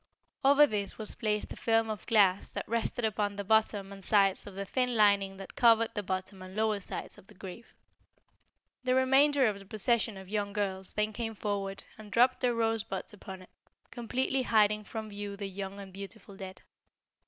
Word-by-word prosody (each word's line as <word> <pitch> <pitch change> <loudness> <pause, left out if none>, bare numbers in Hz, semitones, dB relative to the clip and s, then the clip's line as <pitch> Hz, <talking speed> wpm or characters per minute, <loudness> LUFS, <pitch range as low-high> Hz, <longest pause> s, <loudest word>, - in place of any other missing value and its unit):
Over 285 +2 +7
this 205 -6 -3
was 215 -2 -6
placed 210 -1 -2
a - - -9
film 225 -1 +2
of 210 - -7
glass 200 -4 +3
that - - -4
rested 230 +1 -1
upon 205 -1 -1
the 200 - -4
bottom 205 -1 +1
and 195 -1 -11
sides 195 -1 +3
of 200 - -9
the 200 0 -4
thin 250 +4 0
lining 200 -2 +3
that 195 -1 -9
covered 230 -1 +4
the 205 - -2
bottom 185 0 -4
and 185 +1 -10
lower 215 -1 +1
sides 200 - -7
of 195 - -20
the 210 - -17
grave. 190 +5 -10 1.1
The 255 0 +2
remainder 270 +2 +4
of 210 -3 0
the 195 - -13
procession 220 0 +1
of 190 -1 -10
young 205 0 -2
girls 190 -2 -3
then 210 0 0
came 225 0 -4
forward 200 -1 -3
and 210 -1 -11
dropped 250 +4 +4
their 245 -2 +2
rosebuds 225 -1 -1
upon 190 -2 -9
it, - - -18 0.4
completely 255 +2 -1
hiding 215 -3 +3
from 220 0 -6
view 205 -1 -6
the 200 - -4
young 195 +1 -6
and 195 -2 -10
beautiful 200 +1 -10
dead. 190 -1 -9
210 Hz, 190 wpm, -30 LUFS, 195-225 Hz, 1.1 s, Over